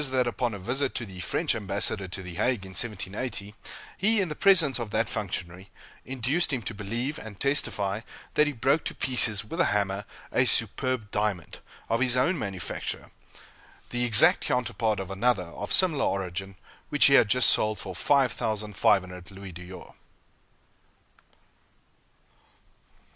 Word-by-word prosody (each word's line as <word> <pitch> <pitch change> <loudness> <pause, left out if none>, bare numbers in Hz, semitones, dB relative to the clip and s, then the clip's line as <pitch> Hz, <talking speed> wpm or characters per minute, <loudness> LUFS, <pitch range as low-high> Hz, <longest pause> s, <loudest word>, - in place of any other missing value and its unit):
that 130 -1 +1
upon 120 0 -1
a 100 - -6
visit 130 +8 -2
to 120 - -3
the 95 -3 -11
French 90 - 0
ambassador 100 -1 -1
to 95 +1 -7
the 90 -1 -8
Hague, 115 +2 -1
in 95 - -10
1780, 105 +1 -3 0.5
he, 215 +3 +2
in 185 -4 0
the 150 - -5
presence 165 -10 +4
of 115 -3 -4
that 110 +2 0
functionary, 95 -3 -5 0.4
induced 135 +7 0
him 130 -4 -2
to 110 - -4
believe 115 +8 -4
and 110 -3 -10
testify 105 -7 0 0.3
that 150 - +4
he - - 0
broke 135 +4 +1
to - - -4
pieces, 115 -5 +4
with 165 +10 -7
a 170 - +4
hammer, 100 -1 -1 0.3
a - - +3
superb 130 -5 +1
diamond, 105 -6 -2 0.3
of 115 - 0
his 125 -1 +3
own 150 +9 +2
manufacture, 95 - -5 0.8
the 120 0 -1
exact 125 - +6
counterpart 115 -4 -1
of 95 0 -6
another, 100 0 +1
of 100 +4 -8
similar 165 -7 +4
origin, 95 0 -3 0.3
which 145 - +4
he 140 - +5
had 115 -6 +6
just 125 +3 +4
sold 110 0 +3
for 95 - -7
5,500 105 -6 0
louis 95 -1 -10
d'or. 90 +2 -11
110 Hz, 150 wpm, -27 LUFS, 95-130 Hz, 0.8 s, exact